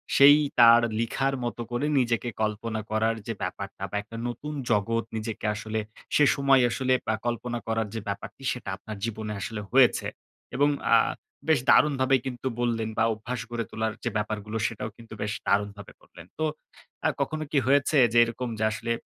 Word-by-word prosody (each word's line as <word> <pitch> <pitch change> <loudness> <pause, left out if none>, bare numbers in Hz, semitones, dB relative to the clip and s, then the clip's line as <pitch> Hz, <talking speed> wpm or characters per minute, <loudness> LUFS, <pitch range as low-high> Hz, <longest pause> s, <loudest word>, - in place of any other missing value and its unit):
সেই 145 +2 +9 0.2
তার 115 0 +8 0.2
লিখার 135 +4 0
মতো 120 0 -3
করে 120 +5 -1
নিজেকে 120 -1 0
কল্পনা 110 +1 -2
করার 110 +1 +1
যে 115 - -1
ব্যাপারটা 95 +1 -5
বা - - -5
একটা 115 +2 -10
নতুন 135 +6 -5 0.2
জগৎ 115 +2 +1
নিজেকে 110 0 -4
আসলে 110 +1 -3 0.4
সে 150 - +6
সময় 135 -1 +4
আসলে 130 +1 0 0.2
আ - - +1
কল্পনা 120 0 -2
করার 110 -1 0
যে 115 - -1
ব্যাপারটি 100 +6 -6
সেটা 120 -5 -7
আপনার 105 +2 -8
জীবনে 110 -1 -4
আসলে 110 +2 -4
হয়েছে। 130 -1 +4 0.5
এবং 145 +3 +4 0.3
আ - - +8 0.5
বেশ 160 -3 +4
দারুণভাবেই 135 -3 +4
কিন্তু 130 0 -4
বললেন 115 -2 0
বা - - +3
অভ্যাস 115 +3 -5
গড়ে 120 -1 -3
তোলার 110 0 -2
যে 120 - 0
ব্যাপারগুলো 105 +1 -3
সেটাও 110 -1 -5
কিন্তু 115 -1 -12
বেশ 105 0 -1
দারুণভাবে 100 0 -1
বললেন! 85 - -14
তো 155 - +1 0.6
আ - - +4
কখনো 155 0 -2
কি - - +1
হয়েছে 140 +2 +3 0.2
যে - - +3
এরকম 120 +2 -3
যে - - 0
আসলে 115 +2 -3
115 Hz, 175 wpm, -27 LUFS, 110-130 Hz, 0.6 s, সেই